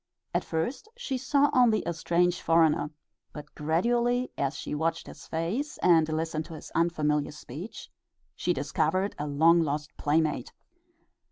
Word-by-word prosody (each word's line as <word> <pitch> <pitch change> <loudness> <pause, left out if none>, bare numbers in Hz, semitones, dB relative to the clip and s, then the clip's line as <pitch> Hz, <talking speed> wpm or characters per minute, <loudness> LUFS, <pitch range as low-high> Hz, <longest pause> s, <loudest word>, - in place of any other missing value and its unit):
At - - +1
first 240 - -3
she 395 - -3
saw 280 +2 +2
only 245 -5 +4
a 170 - -1
strange 175 +2 +1
foreigner, 160 -2 +3 0.4
but 150 -1 -10
gradually, 240 +11 +1
as 140 +1 -1
she - - -5
watched 165 +2 -1
his - - -12
face 200 - -2
and 165 -3 +5
listened 160 0 -2
to 165 - -9
his 155 - -10
unfamiliar 150 -3 +1
speech, 150 - -9 0.5
she - - 0
discovered 190 +2 0
a 150 - -2
long 165 +4 +4
lost 150 -1 -3
playmate. 150 -3 0
165 Hz, 145 wpm, -28 LUFS, 150-205 Hz, 0.5 s, and